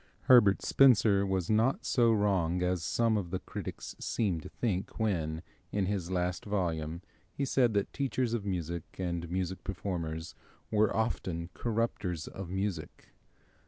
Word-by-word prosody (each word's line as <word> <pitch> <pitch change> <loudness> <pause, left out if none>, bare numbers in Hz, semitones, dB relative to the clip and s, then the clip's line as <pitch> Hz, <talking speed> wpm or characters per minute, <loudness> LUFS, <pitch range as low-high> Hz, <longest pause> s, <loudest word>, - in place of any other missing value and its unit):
Herbert 120 -7 +6
Spencer 105 -7 +5
was 95 -3 0
not 110 +5 +2
so 120 -2 +4
wrong 95 -5 +1
as 90 -1 0
some 115 +2 +2
of 95 -4 -3
the 95 - -1
critics 90 - -7
seem 95 -8 -1
to - - -9
think 100 -5 -2
when, 85 -7 -1 0.3
in 100 -2 0
his 95 -3 -2
last 90 -1 -1
volume, 85 -4 -2 0.3
he 140 - -2
said 125 -4 +2
that 100 - 0
teachers 130 -3 -1
of 115 -4 -1
music 85 -4 -4
and 85 -2 -3
music 95 +1 -2
performers 85 -4 -4 0.4
were 110 -1 +3
often 90 -6 -2
corrupters 105 -8 -2
of 95 -3 -7
music. 95 -5 -4
95 Hz, 145 wpm, -31 LUFS, 85-110 Hz, 0.4 s, Herbert